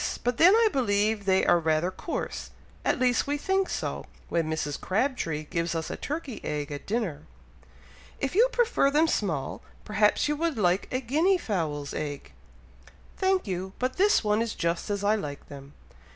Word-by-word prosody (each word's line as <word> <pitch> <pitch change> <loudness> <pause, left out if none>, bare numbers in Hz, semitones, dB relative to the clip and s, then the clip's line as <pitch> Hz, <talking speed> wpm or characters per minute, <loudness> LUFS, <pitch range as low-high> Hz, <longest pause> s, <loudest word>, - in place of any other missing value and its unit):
but 245 0 0
then 370 +5 +7
I 455 0 +5
believe 210 -4 +1
they 190 -1 +3
are 175 - +5
rather 160 +2 +1
coarse, 325 - -5 0.3
at - - +1
least 250 0 +2
we 290 +1 0
think 385 +5 0
so, - - -3 0.2
when 165 -2 0
Mrs. 155 -2 -3
Crabtree 190 - -1
gives 170 +1 -2
us 160 -1 -3
a - - -3
turkey 290 -5 -5
egg 150 -1 -3
at 145 - -7
dinner." 195 -9 -2 0.9
"If 275 - -2
you 465 +6 +5
prefer 475 - +2
them 305 +3 +3
small, 160 - -2 0.2
perhaps 210 +6 +2
you 295 - 0
would 330 -3 -1
like 180 -2 +2
a 255 - -1
guinea 315 +10 +2
fowl's 155 - -3
egg?" 145 -2 -5 0.9
"Thank 380 -1 +1
you! 190 -1 -4
but 255 +1 -2
this 405 - +4
one 210 +1 +2
is 230 -2 -2
just 170 +4 -1
as 205 -1 -2
I 205 +1 +4
like 145 -10 -5
them." 140 0 -11
210 Hz, 175 wpm, -27 LUFS, -, 0.9 s, then